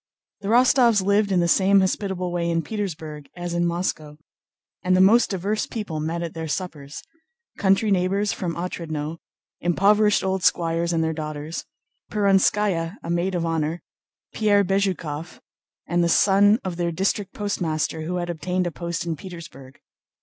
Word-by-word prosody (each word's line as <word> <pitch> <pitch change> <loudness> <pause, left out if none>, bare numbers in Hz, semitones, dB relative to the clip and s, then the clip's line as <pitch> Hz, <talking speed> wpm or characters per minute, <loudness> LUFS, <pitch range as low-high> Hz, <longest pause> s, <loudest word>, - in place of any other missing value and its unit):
The 200 - -7
Rostóvs 235 -3 +4
lived 200 0 +2
in 180 -2 +3
the 170 - +2
same 195 +3 +4
hospitable 190 -1 -1
way 170 -1 -1
in 165 -1 0
Petersburg 155 -7 -5
as 175 -1 -5
in 175 0 +1
Moscow, 170 -4 -3 0.6
and 185 0 +2
the - - +3
most 215 +6 +5
diverse 200 +3 -1
people 205 -9 -4
met 165 +3 -2
at 165 - -5
their 160 -1 -5
suppers. 150 -3 -5 0.6
Country 195 +2 +3
neighbors 195 +2 +1
from 175 -3 -4
Otrádnoe, 165 -3 -4 0.4
impoverished 205 +4 +3
old 190 0 -1
squires 165 +1 +1
and 165 -1 +1
their 160 0 0
daughters, 155 0 -5 0.5
Perónskaya 195 -3 +2
a 170 - -4
maid 175 +2 0
of 170 -1 -1
honor, 165 0 -2 0.5
Pierre 205 -2 +3
Bezúkhov, 180 -5 -2 0.5
and 175 0 +1
the 170 - +2
son 205 +4 +5
of 180 -3 -4
their 170 -1 -1
district 195 +3 -1
postmaster 165 -6 -2
who 170 +3 -3
had 175 -1 -2
obtained 180 +2 -2
a 175 - -2
post 170 0 -4
in 165 -1 -2
Petersburg. 140 -6 -11
175 Hz, 155 wpm, -23 LUFS, 165-195 Hz, 0.6 s, most